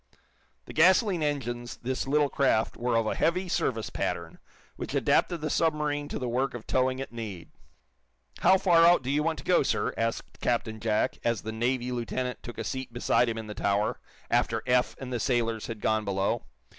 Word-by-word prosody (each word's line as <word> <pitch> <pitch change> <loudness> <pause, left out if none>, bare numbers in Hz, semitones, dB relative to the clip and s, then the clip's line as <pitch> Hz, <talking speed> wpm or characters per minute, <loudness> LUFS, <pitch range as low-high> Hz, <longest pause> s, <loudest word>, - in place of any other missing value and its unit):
The - - -10
gasoline 185 +2 +4
engines 120 -5 -2
this 130 +2 -3
little 145 +1 +3
craft 135 -6 +1
were 120 0 -1
of 115 -1 +2
a - - 0
"heavy 180 +3 +1
service" 115 -9 -1
pattern, 85 -1 -3 0.4
which - - -5
adapted 175 -3 +2
the 155 - -2
submarine 150 -2 0
to - - -4
the 125 - -3
work 125 +2 -1
of 120 - -8
towing 130 0 +1
at 135 - -5
need. 105 -7 -7 0.9
"How 190 - +5
far 175 -3 +5
out 170 -4 +6
do 130 - -2
you 145 +1 +2
want 160 +1 0
to - - -9
go, 180 - +4
sir!" - - 0
asked 115 0 -3
Captain 115 -2 -1
Jack, 110 -1 0
as 115 -3 0
the 110 - -4
Navy 120 +2 -1
lieutenant 125 +1 -3
took 120 - -9
a - - -3
seat 130 -2 -4
beside 120 0 +2
him 115 - -3
in 110 - -5
the 105 - -6
tower, 100 +1 0 0.3
after - - +1
Eph 125 0 +2
and 130 -1 -6
the 120 - -1
sailors 115 -3 0
had 110 -3 -6
gone 110 0 +1
below. 100 +3 -1
125 Hz, 195 wpm, -28 LUFS, 115-145 Hz, 0.9 s, out